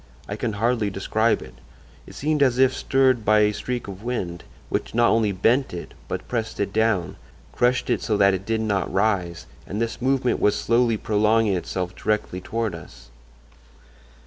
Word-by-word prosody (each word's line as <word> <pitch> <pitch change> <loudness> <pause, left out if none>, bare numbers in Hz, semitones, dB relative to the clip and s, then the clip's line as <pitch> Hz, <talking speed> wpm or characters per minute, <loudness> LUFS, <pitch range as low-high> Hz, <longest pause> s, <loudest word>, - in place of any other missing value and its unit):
I 105 - -4
can 110 0 -2
hardly 115 0 0
describe 110 +4 0
it. 65 - -13 0.5
It - - -12
seemed 150 +1 0
as 130 -3 +3
if 130 0 +4
stirred 130 -3 +2
by 105 0 +4
a 105 0 +3
streak 125 +1 -4
of 100 0 -8
wind, 95 -8 -4 0.2
which - - -3
not 120 0 +4
only 110 -2 +2
bent 115 +4 +1
it, 85 - -8
but - - -5
pressed 115 -2 -3
it 100 0 -1
down—crushed 110 - -1
it 120 - 0
so 105 -3 0
that 100 -1 +5
it 95 0 -3
did 110 +2 -1
not 100 -4 -1
rise; 95 -5 0 0.2
and 100 - -4
this 115 +1 -3
movement 130 -1 +1
was 105 - +3
slowly 115 -1 +2
prolonging 105 0 +2
itself 90 0 -4
directly 105 -3 -2
toward 110 +2 -2
us. - - -12
110 Hz, 170 wpm, -23 LUFS, 100-120 Hz, 0.5 s, that